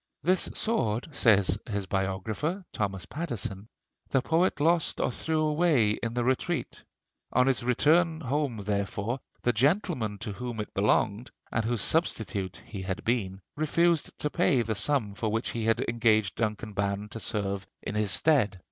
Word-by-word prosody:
"This 185 +1 +2
sword," 120 - 0
says 100 - +3
his 100 -2 -2
biographer, 100 - -2
Thomas 95 -3 -2
Pattison, 110 - -5 0.4
"the 135 -2 +2
poet 165 +2 +2
lost 165 +2 +2
or - - +1
threw 160 +5 -1
away 150 -8 +3
in 115 +2 -3
the 120 - +1
retreat. 130 +1 -1 0.5
On 125 - +4
his 135 -1 +2
return 160 +7 +3
home 140 -3 -1
therefore 100 +4 -2 0.2
the 120 - +2
gentleman 130 - +1
to 110 0 -5
whom 120 +1 -5
it 105 - -5
belonged, 105 +3 +1 0.2
and 110 - 0
whose 115 -2 0
substitute 105 - 0
he 100 -4 -7
had 95 0 -4
been, 100 -5 -1
refused 165 +2 +1
to 150 - -2
pay 125 -4 +2
the 110 0 -1
sum 110 -1 +1
for 110 +2 -2
which 110 +2 -1
he 115 -1 -3
had 115 0 +2
engaged 110 -4 +2
Duncan 110 -1 -3
Ban 100 +1 -1
to 115 - -7
serve 100 -3 -2 0.2
in - - -4
his 105 -1 0
stead. 110 - +3
115 Hz, 160 wpm, -28 LUFS, 100-145 Hz, 0.5 s, On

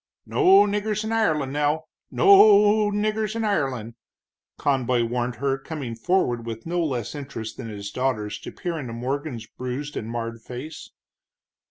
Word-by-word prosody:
"No 390 -2 +5
niggers 210 +1 -1
in 220 - -3
Ireland, 155 -12 +1
now 150 +2 +1 0.3
no - - 0
o 210 - +7
o - - -1
niggers 215 +1 -1
in 230 - -1
Ireland!" 135 - -1 0.6
Conboy 125 -3 +1
warned 120 +1 -2
her, 135 +1 -1
coming 135 -4 -6
forward 120 -2 0
with 115 -1 -7
no 175 +1 0
less 125 -8 -2
interest 135 -6 -6
than 115 -3 -6
his 100 -1 -6
daughter's 110 -5 -2
to - - -8
peer 170 -2 -4
into 125 -5 -6
Morgan's 125 0 -4
bruised 130 +5 -6
and 110 - -4
marred 115 -1 -4
face. 130 +7 -8
140 Hz, 160 wpm, -24 LUFS, 120-200 Hz, 0.6 s, o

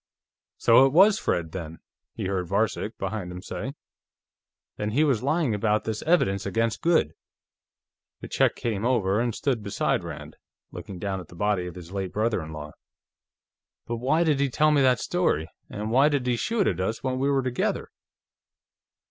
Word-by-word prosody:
"So 120 +3 +6
it 135 - -3
was 200 +5 +6
Fred, 80 -2 -1
then," 85 -3 -6 0.4
he - - -4
heard 95 -2 -1
Varcek, 105 +3 -1
behind 95 -2 -4
him, 90 +1 -8
say. 135 +5 -5 1.0
"Then 105 - -2
he 145 +6 +3
was 135 -8 +2
lying 145 -2 +1
about 105 +1 +1
this 110 -1 -3
evidence 100 - +2
against 115 +2 -1
Goode." 165 - +2 1.1
The - - -7
Czech - - +2
came 110 -4 -2
over 110 -5 +2
and 120 -1 -1
stood 125 +1 -1
beside 100 -1 -1
Rand, - - -8 0.3
looking 95 - -8
down 95 +1 -3
at 90 - -10
the - - -14
body 100 -1 0
of 90 - -8
his 90 -1 -10
late 95 -2 -4
brother 110 -2 0
in 80 0 -8
law. 75 -1 -7 1.1
"But 120 - -3
why 140 +8 +2
did 150 -4 +2
he 140 -1 +2
tell 155 +4 +3
me 145 -2 +4
that 130 -2 +4
story, 125 - 0 0.2
and 105 +1 -4
why 135 +5 +5
did 140 -4 0
he 125 -1 +1
shoot 215 - 0
at 90 -1 0
us 110 +5 -2
when 130 -1 -1
we 135 +1 +1
were 135 -1 +2
together?" 125 -1 -1
110 Hz, 180 wpm, -26 LUFS, 95-135 Hz, 1.1 s, So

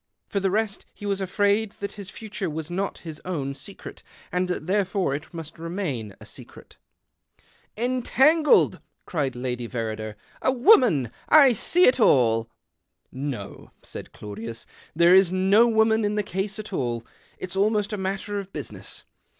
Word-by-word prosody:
For 200 - 0
the 195 0 +1
rest 210 +1 -2
he 205 - -9
was 200 -1 -1
afraid 205 +2 +1
that 200 - -6
[lis 200 -2 -8
future 215 -4 -5
was 160 +1 -5
not 195 +3 -2
his 155 -2 -7
own 145 -7 -3
secret, 195 +7 -9 0.3
and 180 +1 0
that 180 -3 -3
therefore 190 -4 0
it 145 +2 -6
must 165 -1 -9
remain 165 - -4
a - - -12
secret. - - -12 0.5
" - - -35 0.2
Entangled! 295 +5 +4
" - - -49
cried 140 -7 -2
Lady 125 -1 -3
Verrider. 110 -2 -4 0.2
" - - -28
A - - +3
^voman 240 - +4 0.2
I 310 -1 +8
I - - +2
see 350 - +3
it 255 -4 +5
all." 115 - +4 0.4
" - - -51 0.2
No," 100 -6 -8
said - - -8
Claudius, 110 +3 -8 0.2
" - - -26
there 170 +2 +6
is 190 -2 +6
no 195 +5 +4
w^oman 220 0 +3
in 205 0 0
the 210 - 0
case 195 +2 -3
at 215 -1 -7
all. 120 -7 -2 0.3
It's 185 0 -7
almost 210 +1 +1
a - - +1
matter 195 +2 -3
of 195 -1 -8
business. - - -7
190 Hz, 175 wpm, -25 LUFS, 140-210 Hz, 0.5 s, I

